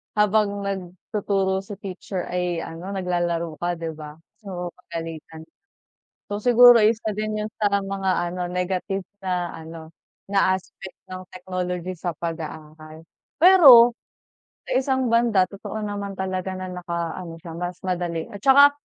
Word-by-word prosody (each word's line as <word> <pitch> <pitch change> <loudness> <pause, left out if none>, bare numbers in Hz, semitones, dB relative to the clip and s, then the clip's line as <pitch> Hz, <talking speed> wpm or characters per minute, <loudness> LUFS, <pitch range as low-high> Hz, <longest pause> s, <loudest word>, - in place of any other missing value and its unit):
habang 210 -1 +2
nagtuturo 190 +1 -2
si 195 +1 -8
teacher 190 -1 -6
ay 180 -2 -2
ano, 180 +5 -7
naglalaro 175 -3 -2
ka, 175 0 -1
'di 165 -1 -5
ba. 150 -1 -10 0.3
Oo, 180 -2 -5
pagalitan. 165 -2 -8 0.8
So 205 +1 -4
siguro 245 -2 +8
isa 220 -1 +1
din 215 0 -2
'yun 210 0 -3
sa 200 -1 +3
mga 195 -1 -3 0.2
ano 180 +1 -5
negative 185 +1 -2 0.2
na 180 -2 -2
ano, 160 0 -10 0.3
na 195 -1 +3
aspect 190 +1 -13
ng 185 0 -7
technology 180 0 -4
sa 175 +1 -3
pag-aaral. 155 -1 -7 0.3
Pero 275 -10 +9 0.7
sa - - -6
isang 260 -2 0
banda 230 -5 +4
totoo 205 +2 -6
naman 200 -1 -4
talaga, 185 0 -3
na 185 0 -5
naka-ano 170 -1 -5
siya, 165 - -8
mas 180 0 -3
madali 175 -3 -2
at 205 - -8
saka 280 +1 +8
185 Hz, 135 wpm, -23 LUFS, 170-205 Hz, 0.8 s, Pero